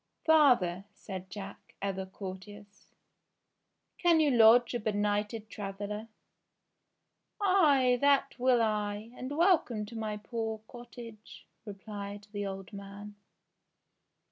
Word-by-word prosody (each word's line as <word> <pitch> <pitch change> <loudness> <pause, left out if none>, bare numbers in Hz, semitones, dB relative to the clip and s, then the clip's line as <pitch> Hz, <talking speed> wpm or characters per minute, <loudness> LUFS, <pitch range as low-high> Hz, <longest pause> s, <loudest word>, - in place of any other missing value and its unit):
''Father," 245 - +4
said 190 -2 -8
Jack, 195 +1 -10
ever 190 -1 -3
courteous, 200 +2 -10 1.0
"can 340 -2 +4
you 300 -2 +3
lodge 235 0 +6
a 240 - -1
benighted 210 +1 -1
traveller 205 +1 -6 0.8
?" - - -52
"Ay, 290 -11 +4
that 275 -2 +2
will 245 -2 +4
I, 210 0 -2
and 265 +4 -6
welcome 320 - +2
to 230 - -11
my 215 -2 -3
poor 220 +1 -4
cottage,'* 235 -3 -12 0.2
re 205 - -6
plied 205 0 -8
the 205 -1 -3
old 195 +1 -7
man. 200 +1 -9
215 Hz, 115 wpm, -30 LUFS, 200-245 Hz, 1.0 s, lodge